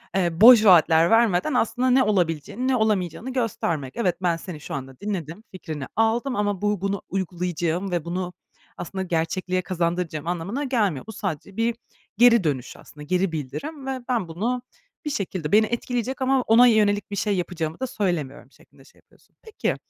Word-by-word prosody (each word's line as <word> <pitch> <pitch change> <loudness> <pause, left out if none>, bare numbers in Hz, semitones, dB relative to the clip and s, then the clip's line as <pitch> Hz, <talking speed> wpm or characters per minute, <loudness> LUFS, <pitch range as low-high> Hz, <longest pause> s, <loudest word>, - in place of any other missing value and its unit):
eee, 175 -2 0
boş 230 -1 +9
vaatler 165 -3 +6
vermeden 225 +2 +3
aslında 250 +1 +1
ne 260 +1 +5
olabileceğini 190 - -1
ne 265 - +2
olamayacağını 215 +1 -1
göstermek. 170 - -2
Evet, 185 -7 +1
ben 175 -2 +1
seni 165 -2 -8
şu - - -8
anda 135 -1 -7
dinledim, 190 -2 -5
fikrini 155 -7 -6
aldım 235 +4 +1
ama 205 -3 -1
bu 205 -2 0
bunu 200 0 -2
uygulayacağım 180 -1 -2
ve 175 -3 -2
bunu 180 +1 -4 0.4
aslında 190 +2 -5
gerçekliğe 185 +2 -1
kazandıracağım 170 -3 -2
anlamına 180 - -3
gelmiyor. 210 - 0
Bu, - - -6
sadece 195 -2 -5
bir 230 +1 +1 0.4
geri 235 -2 +6
dönüş 140 -6 -3
aslında, 150 - -13
geri 180 +4 0
bildirim 265 - -6
ve 265 -1 -2
ben 235 -8 0
bunu 225 +10 -2 0.4
bir - - -1
şekilde 185 - -3
beni 215 +1 +5
etkileyecek 245 +3 -3
ama 265 0 +2
ona 240 +1 +6
yönelik 205 -3 +2
bir - - -3
şey 205 +1 0
yapacağımı 165 -3 -3
da 260 - -2
söylemiyorum 175 - -3
şeklinde - - -22
şey - - -23
yapıyorsun. - - -29
Peki, 440 -2 -3
190 Hz, 170 wpm, -24 LUFS, 170-230 Hz, 0.4 s, boş